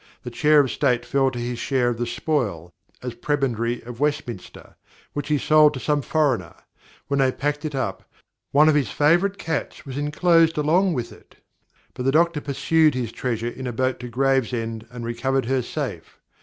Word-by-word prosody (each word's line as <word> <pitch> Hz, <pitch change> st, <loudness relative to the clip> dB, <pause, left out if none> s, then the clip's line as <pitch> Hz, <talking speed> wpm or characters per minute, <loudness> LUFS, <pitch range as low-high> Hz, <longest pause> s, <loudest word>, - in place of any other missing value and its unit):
the 125 Hz, -, -6 dB
Chair 150 Hz, +3 st, +4 dB
of 130 Hz, -4 st, -1 dB
State 125 Hz, -4 st, +1 dB
fell 135 Hz, +2 st, +2 dB
to 125 Hz, -, -8 dB
his 120 Hz, 0 st, -3 dB
Share 125 Hz, -1 st, +1 dB
of 120 Hz, -1 st, -3 dB
the 120 Hz, -, -1 dB
Spoil 100 Hz, -, -2 dB, 0.3 s
(as 125 Hz, -2 st, -4 dB
Prebendary 120 Hz, -3 st, -1 dB
of 120 Hz, 0 st, -9 dB
Westminster) 145 Hz, -8 st, -4 dB, 0.4 s
which 145 Hz, -1 st, -4 dB
he 150 Hz, -1 st, +2 dB
sold 150 Hz, +1 st, +4 dB
to -, -, -4 dB
some 150 Hz, +2 st, 0 dB
Foreigner; 130 Hz, -, 0 dB, 0.5 s
when 140 Hz, 0 st, 0 dB
they 130 Hz, -1 st, +3 dB
packed 145 Hz, +3 st, -2 dB
it 150 Hz, -2 st, -3 dB
up, 100 Hz, -8 st, -4 dB, 0.4 s
one 150 Hz, +2 st, +5 dB
of 155 Hz, -, +5 dB
his 140 Hz, -7 st, +1 dB
favourite 175 Hz, +7 st, +2 dB
Cats 160 Hz, -4 st, -4 dB
was 135 Hz, 0 st, -5 dB
inclosed 165 Hz, +2 st, +3 dB
along 170 Hz, +5 st, +2 dB
with 120 Hz, -2 st, -3 dB
it; -, -, -18 dB, 0.6 s
but 125 Hz, -, -7 dB
the 135 Hz, -, +2 dB
Doctor 165 Hz, 0 st, +2 dB
pursued 150 Hz, +2 st, +2 dB
his 120 Hz, -3 st, -3 dB
treasure 115 Hz, -2 st, -2 dB
in 130 Hz, +1 st, -7 dB
a -, -, -2 dB
boat 130 Hz, +2 st, -1 dB
to 125 Hz, -, -6 dB
Gravesend 120 Hz, -3 st, -1 dB
and 120 Hz, -1 st, -7 dB
recovered 130 Hz, +3 st, -1 dB
her 130 Hz, +1 st, +1 dB
safe. -, -, -6 dB
135 Hz, 185 wpm, -23 LUFS, 120-150 Hz, 0.6 s, one